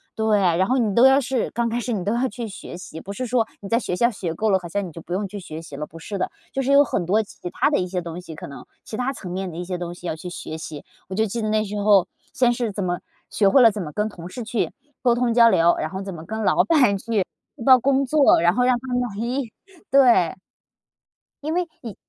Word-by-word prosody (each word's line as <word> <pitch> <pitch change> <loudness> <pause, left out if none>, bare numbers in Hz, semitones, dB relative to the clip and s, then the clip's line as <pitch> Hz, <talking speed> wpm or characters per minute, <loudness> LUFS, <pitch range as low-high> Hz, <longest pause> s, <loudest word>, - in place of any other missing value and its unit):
对， 220 -1 +2
然 185 -1 +2
后 260 - +2
你 220 -5 +1
都 240 +5 +7
要 270 +1 +5
是 255 -2 -1
刚 235 0 -1
开 235 +1 -1
始 245 +1 -3
你 200 -6 -1
都 205 - +1
要 245 +3 +1
去 230 +2 -6
学 190 -3 -9
习， 165 -3 -9
不 195 - -8
是 255 +5 -4
说 240 -2 +1
你 200 - -7
在 230 +2 +2
学 180 - -3
校 235 +6 +3
学 180 -6 -4
够 220 +2 +1
了， 190 - +4
好 175 - -7
像 200 +3 -2
你 - - -10
就 165 - -10
不 165 - -14
用 195 +3 -1
去 205 +1 -7
学 160 -3 -8
习 160 -3 -10
了， 150 +2 -5
不 165 - -13
是 195 +4 -6
的。 - - -1 0.2
就 270 - 0
是 270 +1 0
有 280 +1 +7
很 190 - -1
多 215 +4 +3
其 180 -3 -9
他 295 - +1
的 - - +2
一 180 - -1
些 180 0 -2
东 170 0 -6
西， 165 -3 -10
可 - - -8
能。 140 - -10 0.2
其 215 - -6
他 255 +2 -1
层 180 -8 -8
面 190 0 -3
的 165 - -9
一 175 - -3
些 180 0 -3
东 175 -1 -5
西 175 0 -9
要 - - -2
去 170 +3 -7
学 160 -2 -6
习。 155 -2 -8 0.2
我 190 - -6
就 220 +2 +2
记 230 +3 -3
得 215 - -1
那 215 0 +2
时 210 0 -4
候 200 -3 +5 0.3
先 245 -2 +3
是 235 -2 -2
怎 200 0 -3
么 175 -1 -1 0.3
学 205 - +2
会 265 - +6
了 230 -2 +7
怎 205 -1 -5
么 150 - -5
跟 210 +7 -1
同 175 -5 -10
事 245 +6 -6
去 225 0 -1 0.3
沟 240 -2 +3
通 240 -1 +1
交 230 -1 +7
流， 170 -2 +4
然 155 - -2
后 190 +3 -5
怎 195 -1 -6
么 160 -2 -8
跟 220 +4 -4
老 - - +4
板 255 -12 +3
去 210 0 0 0.3
汇 - - -8
报 260 -1 +8
工 275 +2 +2
作， 280 - +4
然 175 +1 +4
后 250 - +2
让 250 0 +4
他 260 - -11
们 245 - +2 0.2
咦， 240 +3 -2 0.4
对。 240 -11 +5 1.1
因 310 +2 -2
为 355 0 0
你 225 -6 -7
210 Hz, 305 characters per minute, -23 LUFS, 180-245 Hz, 1.1 s, 报